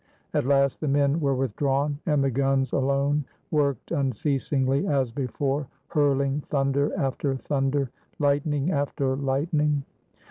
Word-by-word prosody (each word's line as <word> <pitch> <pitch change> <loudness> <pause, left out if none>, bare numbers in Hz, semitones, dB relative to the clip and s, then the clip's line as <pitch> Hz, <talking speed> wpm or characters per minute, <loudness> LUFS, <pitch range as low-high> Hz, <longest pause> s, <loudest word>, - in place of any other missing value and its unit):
At - - +1
last 140 0 +2
the 155 - -1
men 140 +2 +2
were 140 -3 +1
withdrawn; 140 +3 0
and 150 -3 +3
the 135 - +1
guns 135 0 +1
alone 140 +2 +1 0.3
worked 145 -3 0
unceasingly 135 - 0
as 135 -6 +1
before, 135 +2 -2 0.2
hurling 140 -1 +1
thunder 140 0 +1
after 135 0 -1
thunder, 135 -1 -1 0.3
lightning 145 +2 +1
after 140 -3 0
lightning. 145 +2 0
140 Hz, 120 wpm, -26 LUFS, 135-145 Hz, 0.3 s, and